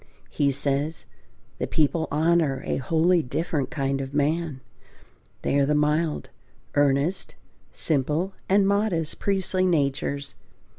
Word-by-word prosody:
He 140 -1 +2
says, 140 +3 -1 0.5
"the - - -1
people 160 +1 +1
honour 155 -3 +2
a - - -1
wholly 165 +6 +2
different 150 +1 -2
kind 135 -1 -1
of 135 +1 -6
man,... 150 -1 0 0.8
They 140 - +2
are 140 - +4
the 150 - +2
mild, 150 +1 0 0.4
earnest, 145 +5 +1 0.4
simple, 155 +5 0 0.2
and 195 0 +4
modest 200 -6 +1
priestly 190 -1 0
natures 140 -3 0
150 Hz, 115 wpm, -25 LUFS, 140-170 Hz, 0.8 s, are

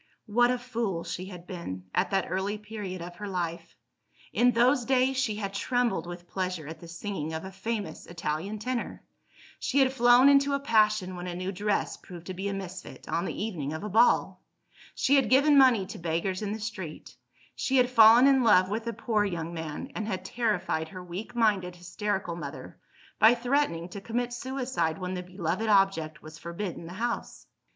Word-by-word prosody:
What 240 +3 +3
a 250 - +1
fool 230 -8 -3
she 185 - -5
had 180 -3 -10
been, 170 - -6
at - - +1
that 195 -2 +1
early 190 +3 -2
period 205 -4 -6
of 175 0 -9
her 205 - -6
life! 175 -3 -4 0.6
In 245 - +4
those 245 +3 +3
days, 260 +1 +2
she 255 -5 0
had 200 -2 -4
trembled 240 -2 0
with 175 0 -8
pleasure 185 -4 -3
at 160 - -8
the 170 - -11
singing 170 -2 -5
of 160 +3 -4
a 190 - -7
famous 205 +2 -4
Italian 170 +4 -3
tenor; 245 +3 -4 0.6
she - - -1
had 265 -1 +4
flown 245 +1 +6
into 280 0 +5
a - - -1
passion 215 -7 +2
when 175 0 -6
a 175 - -4
new 185 +2 -3
dress 205 +2 -1
proved 175 -2 -11
to 185 - -5
be 190 +2 -4
a 200 - -2
misfit, 185 -1 -8
on 170 - -1
the 200 - -3
evening 160 -10 -3
of 160 - -5
a 210 - -4
ball; 225 +5 +3 0.5
she 280 +2 +3
had 270 - +2
given 285 +3 +5
money 255 -8 +6
to - - -8
beggars 170 +3 -1
in 205 -1 -2
the 220 - -4
street; 205 -8 -7 0.4
she 265 - 0
had 250 -1 +5
fallen 230 0 +7
in 270 -1 +5
love 185 -5 +5
with 225 +2 -3
a 230 - -1
poor 220 -3 0
young 170 -4 -3
man, 160 - -5
and 215 - -4
had 190 -3 -3
terrified 190 -8 -1
her 185 0 -8
weak 190 +7 -7
minded 200 -6 +1
hysterical 180 0 -3
mother, 170 - -8 0.4
by 220 +3 +7
threatening 245 - 0
to 195 +2 -8
commit 240 +3 -2
suicide 250 -11 -2
when 185 -1 -4
the 180 - -3
beloved 180 +3 -2
object 195 -6 +2
was 155 0 -11
forbidden 170 +1 -5
the 175 - -8
house. 235 +4 -4
200 Hz, 195 wpm, -28 LUFS, 175-235 Hz, 0.6 s, fallen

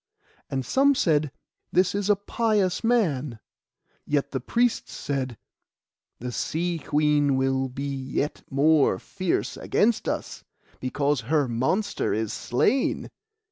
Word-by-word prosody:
And 135 -1 -2
some 280 +1 +4
said, 150 - +2 0.4
'This 180 +1 +3
is 200 0 -1
a 205 - +6
pious 205 -2 0
man;' 155 - +1 0.7
yet 145 -1 0
the 130 - -1
priests 240 - 0
said, 130 -4 -3 0.8
'The 125 +1 -5
Sea 170 +6 -2
Queen 150 -2 +2
will 135 0 +1
be 140 +2 -4
yet 135 +2 -3
more 145 +2 +4
fierce 185 -3 -2
against 225 +1 +1
us, - - -4 0.4
because 140 +1 0
her 150 -3 +3
monster 130 - 0
is 110 -1 -2
slain. 120 - 0
150 Hz, 120 wpm, -25 LUFS, 130-195 Hz, 0.8 s, a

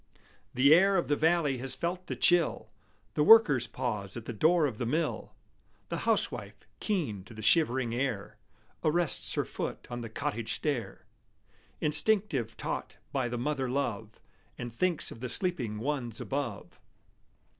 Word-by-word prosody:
The 140 +4 +6
air 195 +4 +5
of 175 - -1
the 145 - +3
valley 155 -4 +2
has 130 +1 -4
felt 180 +2 -3
the - - -3
chill; 175 -2 +2 0.4
The - - 0
workers 150 - +7
pause 105 -4 -4
at 115 - -7
the 120 - -5
door 160 - +3
of 125 -7 -3
the 120 - -1
mill; 155 +5 -2 0.5
The - - -2
housewife, - - -1
keen 150 - -2
to 115 - -13
the 110 - -8
shivering 130 -2 +2
air, 115 -4 -3 0.4
Arrests 165 0 +1
her - - 0
foot - - -5
on 120 0 -4
the 115 - -6
cottage 110 +1 -3
stair, 120 -10 -3 0.8
Instinctive 150 - +1
taught - - -4
by 130 -3 -1
the 120 - -3
mother 135 0 -1
love, 115 -5 -3 0.4
And 120 -2 -6
thinks 175 +5 0
of - - -10
the 125 +1 -4
sleeping 125 - -1
ones 120 -2 -3
above. 135 -7 -4
135 Hz, 155 wpm, -30 LUFS, 115-160 Hz, 0.8 s, workers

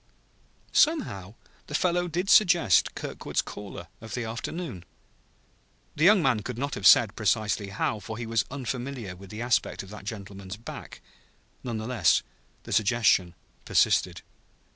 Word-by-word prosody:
Somehow 115 - +1 0.3
the 150 - -4
fellow 175 +1 +1
did 175 +3 -2
suggest 175 - +5
Kirkwood's - - -3
caller 95 -4 -9
of 110 - -7
the 120 - -2
afternoon. 115 - -5 1.1
The 155 - +2
young 200 -2 +6
man 130 -5 +3
could 115 +3 -6
not 140 +3 -3
have 100 - +2
said 110 -4 +6
precisely 110 -1 0
how, 105 +2 -2
for 110 +1 -7
he 120 - -5
was 115 -2 +1
unfamiliar 125 -5 -5
with 95 +1 -13
the 110 +4 -5
aspect 120 -4 0
of 95 - -13
that 105 -2 -10
gentleman's 100 -2 -7
back. 115 - -10 0.6
None 120 -3 -3
the 110 - -5
less 100 - +2 0.4
the - - -6
suggestion 105 -5 +3 0.3
persisted. - - +2
115 Hz, 145 wpm, -27 LUFS, 100-135 Hz, 1.1 s, young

